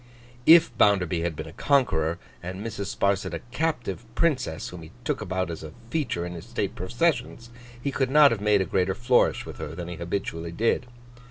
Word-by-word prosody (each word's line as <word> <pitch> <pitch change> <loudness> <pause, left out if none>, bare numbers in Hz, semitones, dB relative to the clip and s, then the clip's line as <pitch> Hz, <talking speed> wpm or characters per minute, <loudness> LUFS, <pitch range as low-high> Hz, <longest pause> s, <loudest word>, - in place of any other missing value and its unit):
If 165 +1 +7
Bounderby 90 -4 +3
had 85 -1 -2
been - - -5
a - - -10
Conqueror, 85 - +2 0.2
and 95 +4 -6
Mrs. 100 -3 -4
Sparsit 95 -3 +1
a - - -4
captive 125 - -2
Princess 125 - 0
whom 90 -1 -9
he 80 - -11
took - - -1
about 95 -2 -2
as 80 - -6
a 80 -1 -9 0.2
feature 125 - -1
in 90 - -5
his 85 - -8
state - - -2
processions, 120 - -1 0.3
he 140 +3 -2
could 135 -1 0
not 150 0 +7
have 110 -3 -2
made 105 -1 +3
a - - 0
greater 95 0 0
flourish 120 +1 +2
with - - -9
her - - -5
than 85 -1 -6
he 85 - -6
habitually 85 -1 -3
did. 115 +5 +1
100 Hz, 195 wpm, -26 LUFS, 85-125 Hz, 0.3 s, If